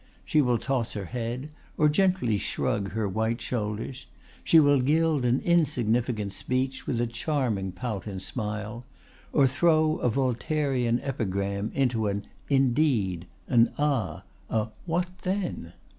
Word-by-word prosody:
She 155 - +3
will 125 -3 +2
toss 130 -2 -1
her 100 -2 -4
head, 125 - -4 0.3
or 150 - +5
gently 155 - +2
shrug 100 -4 -2
her 110 -1 0
white 110 +4 -1
shoulders; 115 +2 -4 0.4
she 165 - +6
will 145 -3 +5
gild 155 0 +2
an 125 +2 +3
insignificant 120 - +1
speech 130 +4 -2
with 120 - 0
a 120 - +2
charming 115 - -1
pout 105 +2 -4
and 95 -2 -4
smile; 105 +2 -4 0.5
or 140 - +4
throw 155 +3 +3
a 125 - +2
Voltairean 130 -1 0
epigram 100 -5 -2
into 120 -5 +1
an 100 0 -2 0.2
'Indeed!' 125 - +2 0.2
an 115 -1 +4
'Ah!' 130 - 0 0.3
a 110 0 0 0.2
'What 180 +2 -1
then! 185 - -3
125 Hz, 135 wpm, -27 LUFS, 105-145 Hz, 0.5 s, she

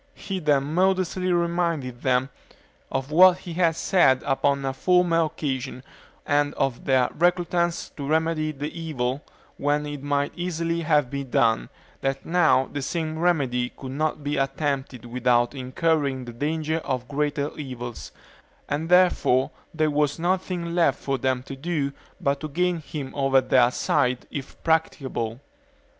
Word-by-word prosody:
He 195 -1 -4
then 145 -4 +2
modestly 185 +3 +1
reminded 170 -7 0
them 130 0 +1 0.6
of 135 +2 -3
what 180 +3 +7
he 180 -2 -8
had 165 -2 +2
said 150 -9 +3
upon 140 0 +1
a 135 - -1
former 175 +1 +3
occasion, 135 -4 -4 0.4
and 145 0 +1
of 130 -3 -1
their 130 -2 +3
reluctance 175 0 +1
to 140 -2 -4
remedy 160 0 +1
the 150 +2 -6
evil 145 -5 -2 0.4
when 145 +1 0
it 145 -2 -6
might 145 0 -1
easily 170 -1 -2
have 150 -5 +2
been 140 -2 -4
done; 115 - +2 0.3
that 135 0 -2
now 160 -6 +3
the 145 - -2
same 160 +2 -3
remedy 135 -8 +1
could 130 -1 -7
not 155 +1 -2
be 145 0 -1
attempted 135 -2 -2
without 120 0 +1
incurring 135 0 0
the 120 - -8
danger 155 +5 -1
of 130 -5 -3
greater 145 0 -1
evils, 125 -5 -7 0.6
and 155 +3 -2
therefore 175 -7 +4 0.2
there 155 -1 +1
was 145 -1 +1
nothing 175 -1 -1
left 170 -5 +3
for 135 -1 -2
them 130 0 0
to 135 - -7
do 145 -1 -2 0.3
but 140 0 0
to 155 - -4
gain 175 +3 0
him 145 -3 -6
over 135 -1 +4
to 130 - -6
their 125 -2 +5
side, 125 0 0
if 140 -2 -7
practicable. 135 -8 -1
145 Hz, 150 wpm, -25 LUFS, 130-165 Hz, 0.6 s, what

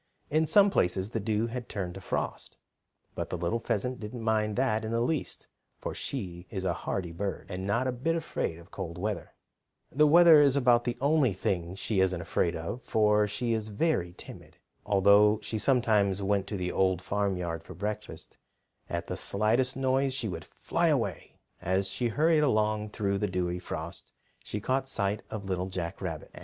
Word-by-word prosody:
In 155 +1 +2
some 205 +2 +6
places 95 - +1
the 115 - -1
dew 110 +1 0
had 120 0 -5
turned 90 -3 -4
to 95 - -9
frost, - - -4 0.6
but - - -4
the - - -3
little 85 +8 -1
pheasant 125 +3 -2
didn't 115 +2 -6
mind 110 -1 +1
that 110 -4 +1
in 110 - -3
the 115 +1 0
least, 140 +5 -2 0.3
for - - -5
she 90 -9 -5
is 95 -3 -4
a 90 - +1
hardy 90 -1 -3
bird, 95 +4 -4
and 95 +1 -4
not 115 +6 +1
a 130 - +1
bit 135 +7 -1
afraid 160 - -2
of 85 +2 -15
cold 85 -3 -6
weather. 105 +3 -4 0.6
The 150 +3 +4
weather 165 -1 +8
is 140 -2 +4
about 120 -3 +4
the 120 -1 -2
only 140 -5 +3
thing 90 -1 -2
she 100 +1 -1
isn't 95 -2 +2
afraid 85 0 0
of, 85 +10 -5
for 105 -2 +3
she 115 +3 -1
is 110 -1 -2
very 105 - 0
timid. - - -11 0.3
Although 100 +1 +5
she 110 - -3
sometimes 105 -7 +2
went 100 0 0
to 105 - -3
the 90 -1 -2
Old 95 -2 +2
Farmyard 90 -5 -1
for 90 - -11
breakfast, 105 +4 -5 0.5
at - - -3
the - - -4
slightest 115 +6 +1
noise 135 0 +1
she 120 -4 -2
would 85 -5 -5
fly - - -1
away. - - -1 0.2
As 95 +2 0
she 120 - -1
hurried 155 +6 +3
along 110 -5 +1
through 100 -1 -1
the 105 - 0
dewy 90 -1 -2
frost 90 - -6 0.3
she 105 - -4
caught 130 +5 0
sight 105 -4 -1
of 105 -3 -5
Little 95 -1 -2
Jack 85 -3 -5
Rabbit. - - -5
105 Hz, 185 wpm, -29 LUFS, 95-125 Hz, 0.6 s, weather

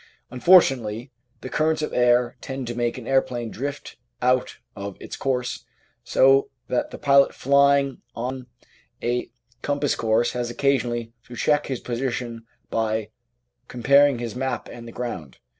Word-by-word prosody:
Unfortunately 125 - +4 0.3
the 130 - -6
currents 155 +1 +1
of - - -3
air 120 0 +3
tend 130 -1 -5
to 120 - -4
make 120 0 -1
an 125 - -8
aeroplane 125 -3 0
drift 140 +4 -6 0.2
out 125 0 +1 0.2
of 100 -1 -6
its - - -7
course, 125 -2 -2 0.4
so 135 +1 +4 0.2
that 125 - 0
the - - -8
pilot 140 -1 +4
flying 140 0 +3
on 125 +1 -4 0.6
a 120 +1 -1 0.3
cempass 145 0 0
course 115 +1 +1
has 120 -1 -3
occasionally 120 -3 0
to 120 - -9
check 150 +3 +1
his 130 -3 -3
position 120 -2 -4 0.2
by 110 -1 -1 0.6
compar 140 +4 +5
ing 135 - -2
his 120 -1 -5
map 130 -2 -3
and 120 -1 -10
the - - -8
ground. 90 - -6
125 Hz, 145 wpm, -24 LUFS, 120-135 Hz, 0.6 s, compar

